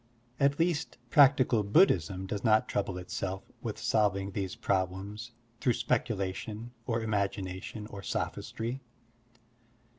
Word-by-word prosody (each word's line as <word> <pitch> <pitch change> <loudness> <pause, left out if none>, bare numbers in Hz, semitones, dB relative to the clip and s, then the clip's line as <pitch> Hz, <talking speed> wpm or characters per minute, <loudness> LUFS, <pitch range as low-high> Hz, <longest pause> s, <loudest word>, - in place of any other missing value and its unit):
At 140 +1 +3
least, 165 -2 0
practical 135 -5 +6
Buddhism 95 - +3
does 100 +1 -4
not 110 -1 +4
trouble 95 -2 -1
itself 95 +1 -4 0.2
with - - -4
solving 100 -2 +1
these 95 -1 -3
problems 100 +4 -2 0.3
through 125 -1 +2
speculation 105 +2 -2 0.2
or 115 -2 0
imagination 100 -1 -2
or 100 -2 -8
sophistry. 115 +5 -3
105 Hz, 110 wpm, -30 LUFS, 95-120 Hz, 0.3 s, practical